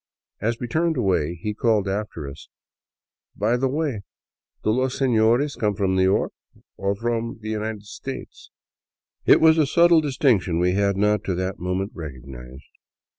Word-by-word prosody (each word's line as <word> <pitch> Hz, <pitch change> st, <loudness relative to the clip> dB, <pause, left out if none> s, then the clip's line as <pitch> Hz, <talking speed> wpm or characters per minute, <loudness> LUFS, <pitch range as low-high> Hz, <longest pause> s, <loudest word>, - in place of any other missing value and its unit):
As 115 Hz, +3 st, -1 dB
we -, -, -3 dB
turned 160 Hz, +4 st, 0 dB
away, 90 Hz, -7 st, +1 dB
he 105 Hz, +6 st, -4 dB
called 110 Hz, -2 st, +1 dB
after 95 Hz, -6 st, -4 dB
us: 70 Hz, +3 st, -11 dB, 0.4 s
" -, -, -60 dB
By 115 Hz, +3 st, +3 dB
the 130 Hz, +2 st, +1 dB
way, 140 Hz, -5 st, -2 dB, 0.6 s
do 110 Hz, -, +2 dB
los 130 Hz, +3 st, 0 dB
seiiores 125 Hz, +2 st, +2 dB
come 105 Hz, -3 st, +1 dB
from 95 Hz, -1 st, 0 dB
New 95 Hz, -, +2 dB
York, 95 Hz, +1 st, +2 dB, 0.4 s
or 100 Hz, +1 st, -1 dB
from 115 Hz, +1 st, -2 dB
the 110 Hz, 0 st, -5 dB
United 110 Hz, -1 st, -4 dB
States? 130 Hz, +5 st, -8 dB, 0.4 s
" -, -, -50 dB
It -, -, +7 dB
was 160 Hz, 0 st, +5 dB
a 150 Hz, -, +3 dB
subtle 170 Hz, +2 st, +5 dB
distinction 125 Hz, -, +1 dB
we 90 Hz, +1 st, +2 dB
had 100 Hz, 0 st, +1 dB
not, 105 Hz, +1 st, +2 dB
to 95 Hz, -, -1 dB
that 95 Hz, +1 st, -3 dB
moment, 90 Hz, +3 st, -2 dB
recognized. 65 Hz, -, -9 dB
105 Hz, 170 wpm, -23 LUFS, 95-125 Hz, 0.6 s, It